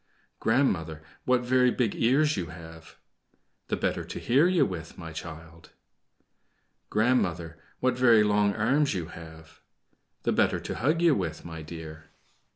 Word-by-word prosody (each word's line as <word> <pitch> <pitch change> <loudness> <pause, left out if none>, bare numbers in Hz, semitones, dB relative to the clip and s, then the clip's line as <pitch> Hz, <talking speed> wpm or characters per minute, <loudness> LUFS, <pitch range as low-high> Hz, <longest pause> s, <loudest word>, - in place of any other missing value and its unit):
"Grandmother, 85 - 0 0.2
what 125 -1 +3
very 125 0 +3
big 120 -4 0
ears 145 +6 +2
you 90 -3 -3
have!" 80 0 -12 0.7
"The - - -1
better - - -1
to - - -8
hear 135 +8 +3
you 180 -2 +3
with, 85 -4 -7
my 80 -1 -8
child." 80 0 -10 1.2
"Grandmother, 90 -8 0 0.2
what 125 -1 +1
very 115 -4 +6
long 105 -1 +2
arms 130 +5 +1
you 85 -2 -4
have!" 80 -1 -13 0.6
"The - - +1
better - - +2
to - - -5
hug 155 +7 0
you 170 -3 +5
with, 80 - -3
my 80 -1 -7
dear." 80 0 -9
100 Hz, 145 wpm, -27 LUFS, 80-125 Hz, 1.2 s, very